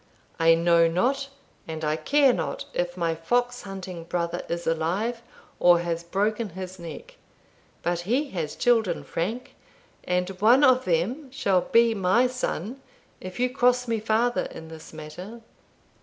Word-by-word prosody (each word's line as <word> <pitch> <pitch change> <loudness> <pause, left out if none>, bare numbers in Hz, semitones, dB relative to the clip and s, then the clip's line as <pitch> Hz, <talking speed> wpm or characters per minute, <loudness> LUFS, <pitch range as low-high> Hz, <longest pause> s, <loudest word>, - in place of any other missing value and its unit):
I 165 0 +6
know 170 0 +4
not, 265 +11 0 0.4
and 160 -1 -4
I 150 0 +1
care 270 - +3
not, 160 -8 -3
if 175 0 -2
my 170 -2 0
fox 245 +9 0
hunting 185 -3 -7
brother 170 0 -2
is 170 0 -3
alive, 185 +9 -1 0.4
or 175 -1 +5
has 170 -1 -3
broken 210 +5 -1
his 185 0 -7
neck; 480 - -9 0.7
but 175 0 0
he 250 +11 -1
has 160 -5 -3
children, 225 -8 +2
Frank, 225 +9 -4 0.5
and 180 0 0
one 245 +6 +6
of 255 -2 +5
them 205 - -1
shall 200 -9 +1
be 230 0 +4
my 200 +4 +3
son 250 - -3 0.4
if 185 +2 -8
you 250 0 +1
cross 250 -1 +2
me 230 -1 0
farther 225 +3 +1
in 160 0 -9
this 160 -1 -11
matter." 175 +9 -9
190 Hz, 150 wpm, -25 LUFS, 170-245 Hz, 0.7 s, I